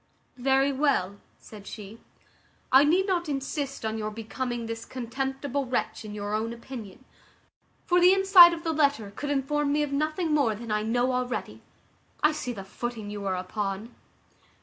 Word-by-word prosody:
"Very 270 +2 +3
well," 260 -9 0 0.2
said 205 -2 -13
she 215 +1 -9 0.7
"I 265 +2 +8
need 350 +6 +3
not 350 -4 -1
insist 275 -2 -3
on 220 0 -2
your 215 0 -2
becoming 230 +3 -4
this 225 0 -5
contemptible 265 +2 -3
wretch 250 -2 -2
in 210 -1 -8
your 205 0 -4
own 225 +2 -1
opinion; 235 -1 -10 0.8
for 355 0 +3
the 360 +1 +7
inside 385 -2 +8
of 335 -1 -5
the 325 -2 -1
letter 280 -9 +1
could 290 - -4
inform 290 +1 0
me 300 +1 +2
of 290 - -3
nothing 310 +3 0
more 275 -8 +2
than 230 +1 -7
I 210 0 +1
know 245 +4 +1
already. 250 0 -3 0.6
I 300 - +6
see 260 -5 -4
the 200 -5 -7
footing 220 +1 -6
you 205 -1 -5
are 190 - 0
upon." 195 +4 -4
255 Hz, 170 wpm, -27 LUFS, 220-290 Hz, 0.8 s, I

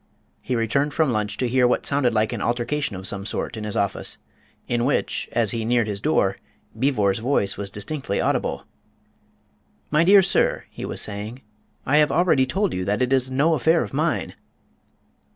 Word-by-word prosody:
He 125 - -2
returned 140 +6 0
from 155 -6 +2
lunch 105 -1 -1
to 125 - 0
hear 125 +1 +3
what 125 - 0
sounded 140 -3 +2
like 110 +1 0
an 115 - -4
altercation 120 +1 -1
of 95 +1 -7
some 100 0 -3
sort 105 - -3
in 110 -1 -6
his 105 - -4
office, 100 -1 -1 0.5
in 120 -1 0
which, 135 - 0
as 115 -4 +2
he 115 -1 -2
neared 120 0 +2
his 100 -2 -4
door, - - +1 0.4
Beevor's 110 -6 +1
voice 115 -4 0
was 100 0 -5
distinctly 105 +3 -3
audible. - - -1 1.3
"My 150 +2 +4
dear 195 +2 +7
sir," 190 - +1
he - - -7
was - - -2
saying, 105 +5 -3 0.4
"I 145 +3 +3
have 150 0 +4
already 155 -6 +3
told 195 +7 0
you 90 - -2
that 105 +6 0
it 125 +1 0
is 130 -1 +2
no 140 +5 +2
affair 160 +1 +2
of - - -8
mine." 155 +3 -1
125 Hz, 185 wpm, -23 LUFS, 105-145 Hz, 1.3 s, dear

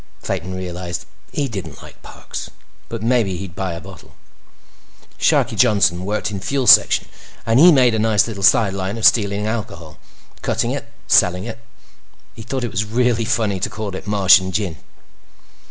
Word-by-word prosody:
Clayton 95 +3 -4
realized 90 -2 -6 0.3
he 145 - -2
didn't 95 - -8
like - - -15
Parks. - - -9 0.4
But 115 -2 -6
maybe 115 -6 +1
he'd 90 -2 -8
buy 95 -2 -3
a - - -7
bottle. - - -14 1.0
Sharkie - - +2
Johnson 100 -7 +2
worked 105 +1 -2
in 100 - -5
Fuels 130 +5 +3
Section, - - +4 0.4
and 115 +3 +3
he 175 +4 +8
made 130 -5 +4
a 110 - 0
nice 110 -1 +2
little 105 -4 -7
sideline 95 +1 +2
of 115 - -1
stealing 105 -2 +3
alcohol, 105 -8 -6 0.4
cutting - - -1
it, - - -4
and - - -27
selling 90 +1 +3
it. 115 +1 -7 0.7
He - - -11
thought 130 +3 -4
it 120 - -3
was 100 - -1
real 120 +3 +1
funny 110 -4 -1
to - - -2
call 105 -3 -6
it 95 - -8
Martian 95 -2 +4
Gin. 95 -4 -3
105 Hz, 170 wpm, -19 LUFS, 95-115 Hz, 1.0 s, he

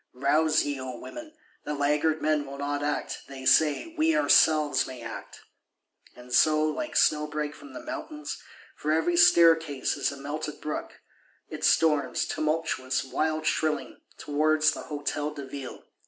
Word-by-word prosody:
Rouse 155 +4 +2
ye, 145 -2 -3
O 130 -1 -6
women; 310 - -10 0.3
the 150 - -4
laggard 150 +2 +1
men 150 -2 +1
will 140 0 -8
not 145 0 -2
act; 145 0 -2
they 135 -1 -9
say, 150 - +3
we 320 0 +2
ourselves 155 - +4
may 125 -2 -9
act! 115 - -9 0.7
And 125 0 -11
so, 155 +2 +4
like 155 - -3
snowbreak 150 0 +1
from 290 - -13
the 310 - -8
mountains, 305 -1 -6 0.3
for 150 - -2
every 165 +2 +1
staircase 165 -5 +4
is - - 0
a 140 - -9
melted 150 +2 -5
brook, 150 - -6 0.5
it - - -7
storms; 150 -3 +2
tumultuous, 155 -4 -1
wild 155 +3 -2
shrilling, 155 0 -1 0.2
towards 155 +1 +2
the - - -6
Hôtel 150 0 -3
de 140 -2 -7
Ville. 135 -1 -8
150 Hz, 150 wpm, -27 LUFS, 140-160 Hz, 0.7 s, ourselves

